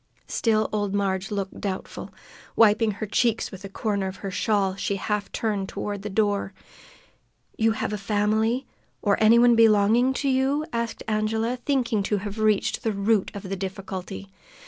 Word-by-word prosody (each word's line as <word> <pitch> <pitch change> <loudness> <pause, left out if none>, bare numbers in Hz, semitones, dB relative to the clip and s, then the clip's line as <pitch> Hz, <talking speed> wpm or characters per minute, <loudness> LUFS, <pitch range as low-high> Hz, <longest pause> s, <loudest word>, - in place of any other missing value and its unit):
Still 220 -2 +1
old 205 -1 -1
Marg 195 -1 -1
looked 195 -2 -4
doubtful. 190 -2 -5 0.4
Wiping 225 0 +5
her 210 +2 -4
cheeks 225 +2 0
with 190 -1 -10
a 195 - -7
corner 200 -1 -2
of 190 0 -8
the 195 - -3
shawl, 200 -1 +1
she 200 0 -2
half 205 +1 -2
turned 205 -4 -2
toward 205 -1 -4
the 210 - -5
door. 205 -1 0 1.1
"Have 220 -1 +1
you - - -1
a - - -6
family, 220 +5 +1 0.4
or 200 -2 +3
any 225 +2 +7
one 240 0 +6
belonging 225 +3 +4
to 280 - -2
you?" 270 +3 +1
asked 235 -1 -3
Angela, 220 +3 0
thinking 255 -6 +1
to 205 +1 0
have 205 +2 -6
reached 215 -2 +1
the 225 -3 -1
root 200 0 +1
of 200 - -6
the 195 0 -4
difficulty. 195 0 -6
210 Hz, 170 wpm, -25 LUFS, 195-225 Hz, 1.1 s, any